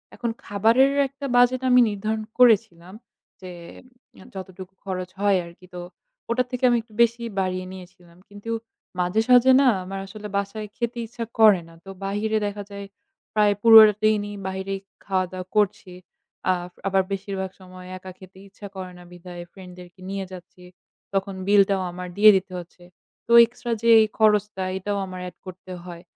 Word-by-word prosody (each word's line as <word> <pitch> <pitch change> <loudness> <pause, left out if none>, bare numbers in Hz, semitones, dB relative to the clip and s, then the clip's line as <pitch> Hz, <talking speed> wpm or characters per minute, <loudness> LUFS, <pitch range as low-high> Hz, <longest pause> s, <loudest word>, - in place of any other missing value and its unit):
এখন 235 - -3 0.2
খাবারের 225 +7 +3 0.2
একটা 275 +1 -9
budget 245 +1 +4
আমি 250 0 +6
নির্ধারণ 215 +2 -3 0.2
করেছিলাম। 205 -7 +3 0.5
যে 185 -1 -9 0.8
যতটুকু 190 0 -9
খরচ 185 -1 -4
হয় 200 -2 +3
আরকি 170 +2 -15
তো 175 - -6 0.5
ওটার 250 +1 0
থেকে 250 0 -5
আমি 240 - +3
একটু 220 -2 -23
বেশি 235 0 -1 0.2
বাড়িয়ে 185 -1 -2
নিয়েছিলাম। 180 -2 -14
কিন্তু 205 +3 -8 0.5
মাঝে 180 +5 +1
সাজে 250 +1 +6
না 270 - +4 0.2
আমার 195 +1 -6
আসলে 210 +1 -9
বাসায় 210 +2 -4
খেতে 235 0 -3
ইচ্ছা 235 0 -6
করে 210 -5 +6
না। 165 - -16
তো 195 - -11 0.2
বাহিরে 215 +2 -1
দেখা 205 0 -6
যায় 200 0 -7 0.5
প্রায় 210 -1 +3
পুরোটা 220 -2 +9
দিনই 210 -1 +1
বাহিরেই 190 +1 -4 0.3
খাওয়া-দাওয়া 185 -1 -2
করছি। 190 -3 0 0.6
আ - - +4 0.3
আবার 195 0 +2
বেশিরভাগ 190 -1 -4
সময় 185 0 -12
একা 185 0 -10
খেতে 190 0 -16
ইচ্ছা 200 +1 -11
করে 185 -1 -7
না 180 - -13
বিধায় 175 0 -10
friend 185 -2 -12
দেরকে 180 +1 -15
নিয়ে 195 -1 -4
যাচ্ছি। 180 0 -13 0.5
তখন 195 0 -1
bill 205 0 +6
টাও 195 -1 +1
আমার 180 +1 -7
দিয়ে 215 +1 +8
দিতে 185 0 -6
হচ্ছে। 175 +1 -14 0.4
তো - - -5
extra 240 0 -7
যে 230 - +1
এই 215 - +2
খরচটা 210 -3 +2
এটাও 200 +2 -3
আমার 185 -1 -8
add - - -23
করতে 185 0 -11
হয়। 175 -1 -10
195 Hz, 165 wpm, -23 LUFS, 185-220 Hz, 0.8 s, পুরোটা